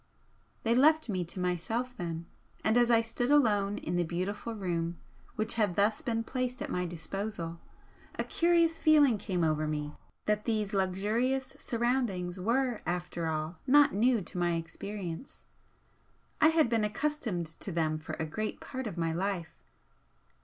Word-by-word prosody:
They 230 - +3
left 310 +2 +4
me 185 -3 0
to 175 - -5
myself 225 +8 -1
then, 170 -5 -4 0.4
and 220 - +3
as 240 -1 +5
I 230 -1 +6
stood 230 +2 -1
alone 210 -8 +3
in 175 +2 -2
the 175 - +2
beautiful 190 +7 -3
room 170 -4 -2 0.4
which 215 +1 0
had 200 -5 +2
thus 210 +2 +2
been 230 -3 -1
placed 255 +1 -2
at - - -4
my 180 0 -1
disposal, 170 0 -4 0.6
a - - 0
curious 335 -1 +2
feeling 290 -8 +5
came 180 -4 -1
over 155 -1 +1
me 150 -1 -3 0.3
that 210 0 +1
these 215 -3 0
luxurious 210 +8 0
surroundings 230 -7 -1
were, 240 +4 +1
after 175 -1 -2
all, 155 +1 -3
not 285 +2 +6
new 230 0 +3
to 180 - -5
my 175 -1 +2
experience. 170 +4 -6 1.0
I - - +8
had 320 -3 +4
been 230 -2 +1
accustomed 215 - -1
to 165 +4 -3
them 155 -2 0
for 155 - -7
a 160 - -2
great 215 +8 -3
part 260 -2 -5
of 180 - -6
my 165 -1 0
life. 180 -2 -2
205 Hz, 160 wpm, -31 LUFS, 175-240 Hz, 1.0 s, I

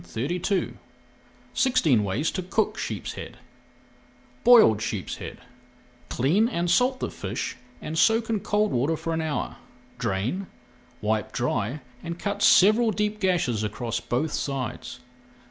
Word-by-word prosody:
[Page - - -17
355] 175 - -1 0.7
SIXTEEN 210 - +3
WAYS 110 +11 -1
TO 185 - -3
COOK 215 +4 0
SHEEPSHEAD 110 - -5 1.1
BOILED 220 - +7
SHEEPSHEAD 110 -4 -4 0.7
Clean 180 - +2
and 175 -6 -1
salt 255 +6 +3
the - - -3
fish - - -4 0.3
and 155 - -4
soak 225 +6 +3
in 225 -2 0
cold 210 +2 +1
water 140 +7 +1
for 165 +1 -3
an 160 - -1
hour. 155 -2 -3 0.4
Drain, 120 - -2 0.5
wipe 110 0 -1
dry, 120 +2 -1 0.2
and 170 0 -5
cut 200 +2 -3
several 215 +5 +6
deep 210 0 -1
gashes 170 - +1
across 110 +3 -3
both 140 +6 -1
sides. 125 -2 -4
165 Hz, 130 wpm, -25 LUFS, -, 1.1 s, BOILED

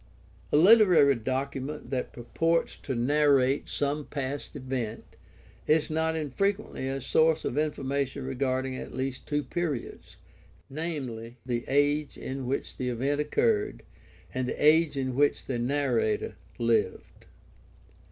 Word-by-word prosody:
A - - +4
literary 180 -6 +7
document 135 +4 -4
that 130 -2 -2
purports 165 +7 0
to 135 - -4
narrate 140 +1 +3
some 145 +1 -1
past 140 +1 -5
event 130 -5 -5 0.5
is 155 0 +2
not 160 +1 0
infrequently 160 +1 -1
a 135 0 -2
source 160 +4 +2
of - - -2
information 140 -2 -1
regarding 130 0 -1
at - - -7
least 130 0 -4
two 145 -1 0
periods, 150 -2 -4 0.5
viz., 135 -7 -4
the 120 -2 -2
age 145 +2 +1
in 130 -1 -5
which 135 - -3
the 125 -1 -2
event 135 +5 0
occurred 420 - 0 0.5
and 130 -1 -1
the - - -4
age 155 -1 +5
in 130 -1 -1
which 145 +3 +2
the 125 -3 -2
narrator 420 - 0 0.2
lived. 445 0 -1
140 Hz, 125 wpm, -28 LUFS, 130-160 Hz, 0.5 s, literary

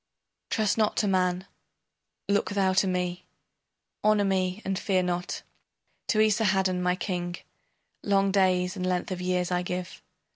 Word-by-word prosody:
Trust 215 0 +1
not 215 -1 +1
to 210 - +2
man, 185 -1 +1 0.8
look 200 0 +1
thou 195 -2 +1
to 190 +1 +3
me 180 -1 -2 0.8
Honor 210 -1 +4
me 185 0 0
and 195 0 -1
fear 190 -3 +1
not. 180 0 -3 0.6
To - - +1
Esarhaddon, 195 -4 +2
my 180 0 +1
king, 175 -2 -3 0.7
Long 195 -1 +2
days 185 -1 +2
and 185 - -4
length 180 0 -1
of 180 -1 -3
years 180 0 0
I 180 0 +1
give. 180 0 -5
185 Hz, 145 wpm, -27 LUFS, 180-195 Hz, 0.8 s, Honor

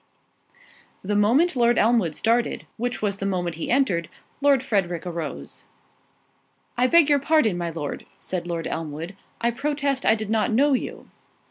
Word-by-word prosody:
The 205 +2 -1
moment 260 +12 +3
Lord 240 -1 +3
Elmwood 220 -9 +2
started, 230 +1 0
which 245 -1 -3
was 200 -2 0
the 195 - -4
moment 175 -4 -2
he 165 - -4
entered, 195 -11 +1 0.3
Lord 280 -2 +4
Frederick 190 -8 -1
arose. 160 - -6 1.1
"I 250 +1 +3
beg 335 +2 +5
your 290 -1 +4
pardon, 280 - +2
my 175 -1 -2
Lord," 155 -3 -5
said 180 -2 -4
Lord 170 -2 -3
Elmwood, 160 +3 -5 0.3
"I 235 0 +2
protest 280 +1 -1
I - - +4
did 215 -1 -5
not 220 +1 +2
know 275 +6 +3
you." 255 - -4
220 Hz, 155 wpm, -24 LUFS, 175-260 Hz, 1.1 s, beg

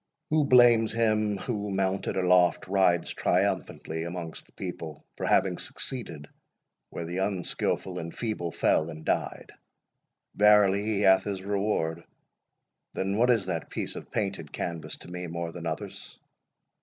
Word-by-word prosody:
Who 155 -1 +3
blames 120 -4 +6
him, 110 -2 +2
who, 105 0 -3
mounted 95 0 -1
aloft, 90 -1 +3
rides 90 -3 +2
triumphantly 80 +1 -1
amongst 85 -1 -6
the - - -25
people, - - -7
for - - -3
having - - +2
succeeded, 85 - -5 0.6
where 85 - -5
the 90 +3 -3
unskilful 95 -2 -1
and 85 0 -6
feeble 105 -7 -3
fell 80 0 +2
and 80 0 -9
died? - - -2 0.8
Verily 105 -1 +5
he 105 -2 0
hath 95 -1 +5
his 95 -2 -4
reward: 95 -5 -1 0.9
Then, 95 +1 -1
what 120 +2 +4
is 115 -6 +3
that 85 -3 -3
piece - - -4
of - - -8
painted - - -3
canvas 85 -2 -4
to - - -12
me 90 0 -5
more 85 0 -4
than 85 0 -6
others? 80 -1 -6
95 Hz, 145 wpm, -28 LUFS, 85-105 Hz, 0.9 s, blames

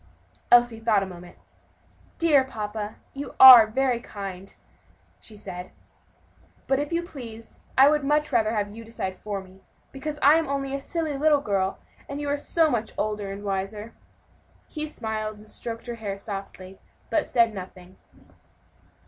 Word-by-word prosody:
Elsie 240 -2 +5
thought 220 -3 +2
a - - -3
moment. 180 -1 -12 0.8
"Dear 300 -5 +4
papa, 215 -4 -5 0.2
you 280 +1 -7
are 250 -4 +11
very 250 +1 0
kind," 195 -4 -8 0.6
she 215 - -15
said, 185 -2 -8 1.0
"but 270 0 +1
if 290 +2 -3
you 340 0 0
please, 230 -9 -10 0.2
I 270 +1 +8
would 300 0 +2
much 300 +1 +1
rather 225 -1 +2
have 205 0 -2
you 230 - -9
decide 205 -5 -5
for 205 -2 -4
me, 190 0 -17 0.3
because 295 +2 -5
I 290 +3 +7
am 325 - -3
only 275 -1 -3
a 275 - -2
silly 310 -1 -3
little 300 -1 +4
girl, 195 -5 -1 0.3
and 280 +1 -5
you 290 -1 -3
are 285 - +1
so 315 +2 +1
much 225 -2 -2
older 210 -2 -2
and 200 +1 -8
wiser." 205 +3 -4 0.7
He 305 -1 -5
smiled, 220 -5 -4
and 210 +1 -16
stroked 230 +1 -7
her 240 - -5
hair 200 -2 -4
softly, 195 -2 -8 0.3
but 315 -3 +1
said 230 -2 +3
nothing. 185 -1 -10
225 Hz, 160 wpm, -25 LUFS, 200-275 Hz, 1.0 s, are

